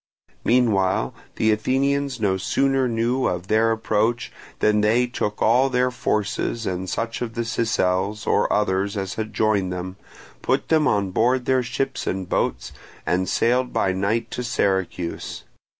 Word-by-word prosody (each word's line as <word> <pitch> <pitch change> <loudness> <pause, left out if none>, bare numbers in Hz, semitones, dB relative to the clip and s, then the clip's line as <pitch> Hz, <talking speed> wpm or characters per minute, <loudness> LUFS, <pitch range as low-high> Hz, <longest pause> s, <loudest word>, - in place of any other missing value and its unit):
Meanwhile 105 -6 +2 0.2
the 110 - +2
Athenians 135 +4 0
no 100 -3 +1
sooner 135 +6 +1
knew 120 +3 0
of 90 +1 -3
their 110 +1 +3
approach 110 +1 0 0.3
than 105 0 +2
they 115 +4 +3
took 105 -4 -3
all 125 +4 +4
their 125 0 +1
forces 115 -1 -1
and 95 -1 -3
such 115 +4 -3
of 115 -2 -4
the 120 - -1
Sicels 105 -3 0
or - - +2
others 100 0 0
as 95 -1 -3
had 110 -1 -4
joined 105 -3 +1
them, 90 +1 -5 0.4
put - - 0
them 155 -2 +3
on 100 -2 +1
board 125 +5 +2
their 130 -1 +2
ships 125 +2 -3
and 95 -1 -2
boats, - - -1 0.3
and 90 +1 0
sailed 125 +2 +1
by 95 - +1
night 100 +5 -1
to - - -3
Syracuse. 95 -7 -2
110 Hz, 150 wpm, -23 LUFS, 95-125 Hz, 0.4 s, all